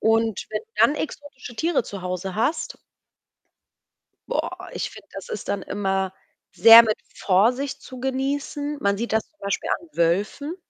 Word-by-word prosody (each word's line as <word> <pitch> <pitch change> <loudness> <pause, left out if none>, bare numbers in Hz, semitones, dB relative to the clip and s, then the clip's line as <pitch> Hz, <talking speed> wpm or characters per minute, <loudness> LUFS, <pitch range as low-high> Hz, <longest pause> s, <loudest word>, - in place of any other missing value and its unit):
Und 225 -1 +1
wenn - - -2
du 450 - -31
dann 295 - +6
exotische 285 -5 -7
Tiere 325 +1 +1
zu 200 -3 -8
Hause 180 +1 -4
hast 230 +9 -1 1.5
boah, - - -3
ich - - -3
finde, - - -14
das - - -8
ist 455 - -6
dann 200 -1 -1
immer 190 -1 -1 0.4
sehr 225 +6 +10
mit 215 -2 0 0.2
Vorsicht 240 +9 +1
zu 255 -1 -10
genießen. 280 +2 -2
Man 200 0 +1
sieht 235 +2 -3
das 220 0 0
zum 310 - -42
Beispiel 200 0 -2
an 340 - -16
Wölfen. 205 - 0
230 Hz, 155 wpm, -24 LUFS, 200-285 Hz, 1.5 s, sehr